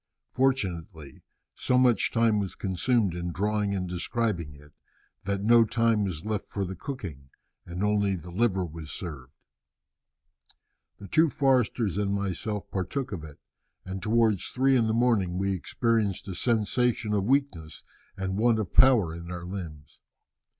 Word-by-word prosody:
Fortunately 95 Hz, -, -2 dB, 0.3 s
so 125 Hz, -, +1 dB
much 125 Hz, -2 st, +3 dB
time 115 Hz, -2 st, +3 dB
was 100 Hz, -2 st, -4 dB
consumed 100 Hz, +1 st, 0 dB
in 85 Hz, 0 st, -4 dB
drawing 105 Hz, +2 st, 0 dB
and 90 Hz, -1 st, -2 dB
describing 90 Hz, -3 st, -2 dB
it 75 Hz, +1 st, -18 dB, 0.5 s
that 100 Hz, 0 st, -1 dB
no 115 Hz, +2 st, +6 dB
time 115 Hz, -1 st, +1 dB
was 90 Hz, -2 st, -5 dB
left 110 Hz, -2 st, -2 dB
for 100 Hz, -1 st, -2 dB
the 95 Hz, +1 st, -6 dB
cooking, 85 Hz, -, -7 dB, 0.4 s
and 90 Hz, +3 st, -4 dB
only 100 Hz, -2 st, +2 dB
the 90 Hz, 0 st, -9 dB
liver 95 Hz, -1 st, +1 dB
was 80 Hz, -1 st, -9 dB
served. 70 Hz, -7 st, -7 dB, 1.7 s
"The 100 Hz, -, -10 dB
two 160 Hz, +8 st, +4 dB
Forsters 125 Hz, -, +1 dB
and 100 Hz, -1 st, 0 dB
myself 100 Hz, +1 st, -3 dB
partook 100 Hz, +8 st, -3 dB
of 90 Hz, -6 st, -5 dB
it, 75 Hz, -2 st, -11 dB, 0.5 s
and 95 Hz, 0 st, -5 dB
towards 110 Hz, -1 st, +2 dB
three 135 Hz, +1 st, +2 dB
in 115 Hz, -3 st, +3 dB
the 110 Hz, -, +1 dB
morning 110 Hz, -7 st, +2 dB
we 95 Hz, +1 st, 0 dB
experienced 105 Hz, +1 st, -1 dB
a 95 Hz, -, -4 dB
sensation 115 Hz, +2 st, 0 dB
of 100 Hz, -2 st, +1 dB
weakness 120 Hz, -, -1 dB, 0.3 s
and 95 Hz, +1 st, -2 dB
want 115 Hz, 0 st, +3 dB
of 110 Hz, -4 st, -3 dB
power 120 Hz, -11 st, +5 dB
in 85 Hz, +1 st, -8 dB
our 90 Hz, -1 st, -6 dB
limbs. 85 Hz, -6 st, -8 dB
100 Hz, 150 wpm, -27 LUFS, 90-115 Hz, 1.7 s, no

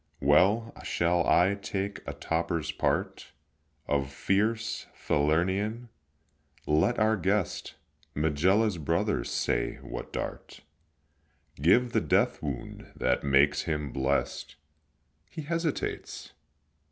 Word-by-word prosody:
Well, 100 Hz, +11 st, +3 dB
shall 85 Hz, 0 st, +1 dB
I 90 Hz, +3 st, +4 dB
take 100 Hz, 0 st, -4 dB
a -, -, -3 dB
toper's 85 Hz, -1 st, -2 dB
part -, -, -2 dB, 0.6 s
Of 70 Hz, -1 st, 0 dB
fierce 105 Hz, +9 st, 0 dB
Falernian? 95 Hz, +10 st, 0 dB, 0.8 s
let 80 Hz, +11 st, +2 dB
our 110 Hz, 0 st, +3 dB
guest, 95 Hz, -1 st, -1 dB, 0.4 s
Megilla's 90 Hz, +7 st, +2 dB
brother, 75 Hz, -, 0 dB
say -, -, -1 dB
what -, -, -7 dB
dart -, -, -6 dB, 1.0 s
Gave 120 Hz, +10 st, +4 dB
the -, -, +2 dB
death -, -, +1 dB
wound 70 Hz, -5 st, -6 dB
that 65 Hz, -, 0 dB
makes 70 Hz, +1 st, +4 dB
him 75 Hz, -3 st, -2 dB
blest. 70 Hz, +2 st, -1 dB, 0.7 s
He 155 Hz, -, -7 dB
hesitates? 165 Hz, 0 st, -3 dB
85 Hz, 100 wpm, -28 LUFS, 75-105 Hz, 1.0 s, I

